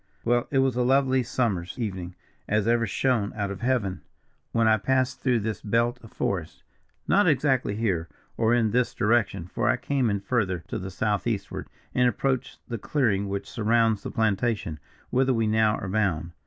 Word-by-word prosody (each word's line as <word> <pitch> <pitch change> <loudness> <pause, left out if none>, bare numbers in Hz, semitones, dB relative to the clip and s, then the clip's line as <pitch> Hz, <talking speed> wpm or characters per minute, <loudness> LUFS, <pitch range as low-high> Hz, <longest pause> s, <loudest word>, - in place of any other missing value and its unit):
"Well, 120 +1 +2
it 135 - 0
was 135 -2 +3
a 125 - +1
lovely 130 +1 +3
summer's 110 -8 -1
evening, 95 -6 -4 0.3
as 105 0 +1
ever 115 -1 +2
shone 115 0 +1
out 100 -2 -2
of 95 - -7
Heaven, 120 -7 0 0.5
when 115 -1 +2
I 110 0 +5
passed 130 +3 0
through 125 -4 +2
this 110 +1 -3
belt 115 +3 +1
of 115 - -14
forest; 90 -5 -3 0.4
not 205 0 +4
exactly 130 -7 +2
here, 95 -7 -1 0.3
or 115 0 +2
in 115 -3 +3
this 125 +1 +1
direction, 105 -5 +1
for 90 - -1
I - - +3
came 135 -4 0
in 100 -1 0
farther 100 -5 -1
to - - -3
the 95 +1 -5
southeastward, 105 +1 -2 0.3
and 125 0 +4
approached 130 0 -2
the 115 -3 -4
clearing 100 -7 0
which 100 0 -3
surrounds 115 -1 +2
the - - -5
plantation, 110 -6 0 0.3
whither 130 +1 +2
we 115 -1 +1
now 110 0 +3
are 100 - -5
bound. 95 -5 0
110 Hz, 180 wpm, -26 LUFS, 100-125 Hz, 0.5 s, I